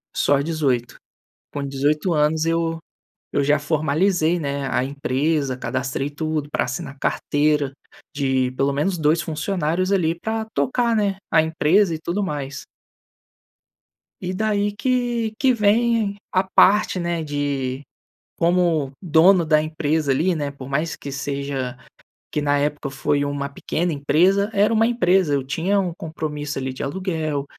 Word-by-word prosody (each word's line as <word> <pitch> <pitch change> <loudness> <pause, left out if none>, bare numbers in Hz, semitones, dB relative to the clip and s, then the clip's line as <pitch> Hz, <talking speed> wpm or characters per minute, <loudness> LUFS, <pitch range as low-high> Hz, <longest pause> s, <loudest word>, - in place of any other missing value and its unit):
Só 145 -1 +3
18. 140 -7 -1 0.6
Com 145 -1 -3
18 150 +6 0
anos, 155 +1 +2
eu 165 0 0 0.5
eu 140 - +1
já 145 +1 +3
formalizei, 160 +3 +1
né, 140 -1 -2
a - - +2
empresa, 140 0 -1
cadastrei 130 +2 -3
tudo 155 -1 -3
pra - - 0
assinar 135 +2 -5
carteira 145 -1 +1 0.5
de 130 -2 +1
pelo 140 +1 +1
menos 170 +6 0
2 155 +2 +2
funcionários, 175 +3 -1
ali, 170 -3 +1
pra 220 +3 -2
tocar, 240 -3 +1
né, 205 -2 +1 0.2
a 160 - +6
empresa 160 +3 +2
e - - -4
tudo 185 +5 -2
mais. 145 -5 -4 1.6
E 180 0 -3
daí 205 0 0
que 240 -2 0
que 260 -2 +3
vem 220 -1 +2 0.2
a 185 - +2
parte, 195 0 +4
né, 170 -1 -1
de, 140 -2 -2 0.5
como 170 -5 +2
dono 170 +1 +5
da 155 -1 +4
empresa 155 -1 -1
ali, 165 +7 +2
né? 145 -2 -2
Por 135 -2 -10
mais 155 +4 -1
que 140 - -8
seja 135 -2 -3 0.5
que 150 - -1
na 145 0 +2
época 145 -1 -2
foi 145 +1 0
uma 145 0 -2
pequena 160 +4 -2
empresa, 180 +8 +2
era 205 +3 +3
uma 225 +1 +4
empresa. 185 -8 +2
Eu 135 - -1
tinha 180 +8 0
um 180 -3 -1
compromisso 150 -3 -5
ali 130 0 -3
de - - -8
aluguel, 155 -3 -2
155 Hz, 145 wpm, -22 LUFS, 140-185 Hz, 1.6 s, a